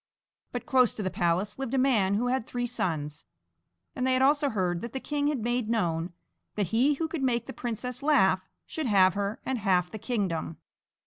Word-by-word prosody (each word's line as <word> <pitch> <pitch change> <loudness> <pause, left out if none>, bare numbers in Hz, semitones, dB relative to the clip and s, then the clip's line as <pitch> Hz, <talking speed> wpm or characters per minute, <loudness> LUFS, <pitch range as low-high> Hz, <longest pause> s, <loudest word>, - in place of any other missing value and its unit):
But 245 - -5
close 255 -3 +3
to 210 - -4
the 185 - -1
palace 180 +6 0
lived 270 -1 -2
a - - +2
man 225 -8 +3
who 230 +4 0
had 250 -1 -1
three 245 0 -2
sons, 155 -11 -3 0.7
and 255 -1 -1
they 260 - +3
had 255 - +2
also 285 +1 +3
heard 180 -6 -1
that 235 - -6
the 265 - -2
king 290 +1 -1
had 285 -7 -1
made 240 -1 -1
known 170 -6 0 0.4
that 205 -5 -1
he 255 +8 +3
who 320 +3 -2
could 320 -2 -4
make 240 -3 +1
the 265 - -7
princess 245 +1 -4
laugh 255 -11 +4 0.2
should 315 -4 -3
have 190 -4 +5
her 200 +2 -2
and 265 -2 -1
half 180 -3 +1
the 220 - -6
kingdom. 190 -9 -2
235 Hz, 205 wpm, -28 LUFS, 190-260 Hz, 0.7 s, have